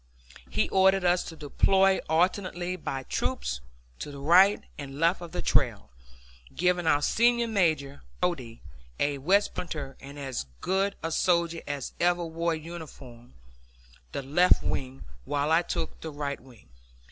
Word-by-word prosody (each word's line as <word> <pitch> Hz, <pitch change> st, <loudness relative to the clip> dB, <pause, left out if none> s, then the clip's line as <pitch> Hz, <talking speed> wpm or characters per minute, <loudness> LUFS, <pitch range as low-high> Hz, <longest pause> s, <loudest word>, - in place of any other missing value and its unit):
He -, -, +1 dB
ordered 190 Hz, 0 st, +4 dB
us 175 Hz, 0 st, +3 dB
to 165 Hz, -, -8 dB
deploy 190 Hz, +6 st, +3 dB
alternately 180 Hz, +1 st, 0 dB
by 135 Hz, -7 st, -4 dB
troops -, -, -2 dB, 0.4 s
to -, -, -5 dB
the 140 Hz, -, -9 dB
right 180 Hz, +8 st, +5 dB
and 140 Hz, -1 st, -8 dB
left 170 Hz, +3 st, +2 dB
of 170 Hz, -2 st, -8 dB
the -, -, -3 dB
trail, -, -, +1 dB, 0.6 s
giving 180 Hz, -1 st, +1 dB
our 145 Hz, -1 st, +3 dB
senior 235 Hz, +4 st, +3 dB
major, 155 Hz, -10 st, 0 dB, 0.2 s
Brodie, 130 Hz, -11 st, -2 dB, 0.4 s
a 145 Hz, -1 st, 0 dB
West 195 Hz, +9 st, +2 dB
Pointer 150 Hz, -7 st, -5 dB
and 140 Hz, +1 st, -11 dB
as 135 Hz, -, -4 dB
good 195 Hz, +1 st, 0 dB
a 165 Hz, -, -2 dB
soldier 170 Hz, 0 st, +1 dB
as 145 Hz, -2 st, -4 dB
ever 175 Hz, 0 st, +2 dB
wore 165 Hz, +1 st, -1 dB
a -, -, -2 dB
uniform, 150 Hz, -, -11 dB, 0.8 s
the 140 Hz, -, -4 dB
left 175 Hz, +7 st, +4 dB
wing, 130 Hz, 0 st, -4 dB, 0.2 s
while 145 Hz, -, -1 dB
I 165 Hz, +1 st, +5 dB
took 170 Hz, -1 st, -4 dB
the 160 Hz, -, -5 dB
right 145 Hz, -2 st, -4 dB
wing. 120 Hz, -, -18 dB
165 Hz, 150 wpm, -28 LUFS, 140-180 Hz, 0.8 s, right